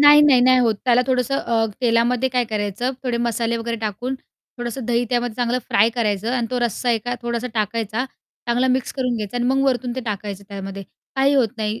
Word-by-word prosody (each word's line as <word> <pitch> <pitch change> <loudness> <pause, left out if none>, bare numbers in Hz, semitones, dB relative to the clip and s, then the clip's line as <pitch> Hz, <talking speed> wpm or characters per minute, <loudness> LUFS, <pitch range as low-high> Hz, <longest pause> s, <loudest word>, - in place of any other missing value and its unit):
नाही, 295 0 +9
नाही, 275 -4 +6
नाही 255 +1 +5
होत 230 -3 +3
त्याला 250 0 +4
थोडंसं 255 +1 +1
अ, 225 -1 +1
तेलामध्ये 240 +2 +2
काय 250 -1 +1
करायचं, 210 +4 -1
थोडे 245 -2 -1
मसाले 235 0 0
वगैरे 230 0 -3
टाकून 225 +4 -3
थोडंसं 240 -1 -8
दही 240 0 +1
त्यामध्ये 240 -2 0
चांगलं 245 0 0
फ्राय 220 +3 +4
करायचं 220 -1 0
आणि 245 -2 0
तो 250 - 0
रस्सा 240 +1 0
एका 240 +2 -1
थोडासा 235 +1 -2
टाकायचा. 220 +2 -1 0.4
चांगला 245 +2 +2
मिक्स 255 0 0
करून 250 -3 -1
घ्यायचा 215 +2 -4
आणि 245 - 0
मग 270 +1 +2
वरतून 250 -2 0
ते - - -1
टाकायचं 205 -2 -4
त्यामध्ये. 195 0 -6 0.3
काही 275 +1 +4
होत 250 -5 +4
नाही, 215 0 -2
240 Hz, 200 wpm, -21 LUFS, 225-250 Hz, 0.4 s, नाही